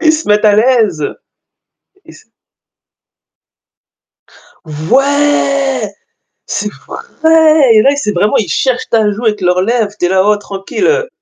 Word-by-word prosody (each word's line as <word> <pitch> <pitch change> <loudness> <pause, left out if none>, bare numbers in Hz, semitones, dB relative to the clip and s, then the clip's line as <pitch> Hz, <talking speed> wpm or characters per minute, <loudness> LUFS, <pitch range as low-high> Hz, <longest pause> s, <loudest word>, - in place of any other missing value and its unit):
Ils 315 -1 +3
se 310 -4 -4
mettent 210 +1 +2
à 210 - +4
l'aise. 215 - +1 1.0
Ils - - -15
se - - -19 2.4
Ouais 275 - 0 0.6
c'est - - -4 0.2
vrai 320 - +2
et 215 - +5
là, 280 +4 +2
c'est 245 -7 -2
vraiment, 205 +2 0
ils 210 - -2
cherchent 255 -2 -1
ta 220 -2 +2
joue 220 +4 -6
avec 210 -1 0
leurs 180 0 +1
lèvres, 220 0 -1
tu 180 - -1
es 175 - 0
là: 190 0 +2
«Oh 210 - +3
tranquille». 205 - -2
230 Hz, 140 wpm, -12 LUFS, 205-285 Hz, 2.4 s, et